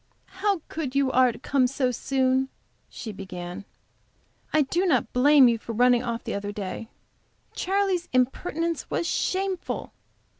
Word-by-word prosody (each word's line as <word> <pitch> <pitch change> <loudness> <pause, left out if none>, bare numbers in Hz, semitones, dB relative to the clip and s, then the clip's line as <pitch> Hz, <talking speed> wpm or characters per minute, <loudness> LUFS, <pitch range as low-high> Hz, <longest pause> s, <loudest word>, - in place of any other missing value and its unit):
"How 400 -4 +1
good 285 -5 -4
you 275 -1 +2
are 255 -1 +5
to 230 - -11
come 265 0 +2
so 255 0 0
soon," 260 +1 +1 0.4
she 225 - -7
began. 185 -1 -7 0.9
"I 310 - +4
did 350 +7 0
not 250 -7 +1
blame 275 +1 +6
you 230 -1 +2
for 230 - -6
running 245 +1 +4
off 235 -1 -3
the - - -4
other 200 0 -3
day; 205 +2 -6 0.6
Charley's 380 -2 0
impertinence 305 +6 0
was - - -1
shameful. 375 +2 -2
260 Hz, 145 wpm, -26 LUFS, 230-325 Hz, 0.9 s, blame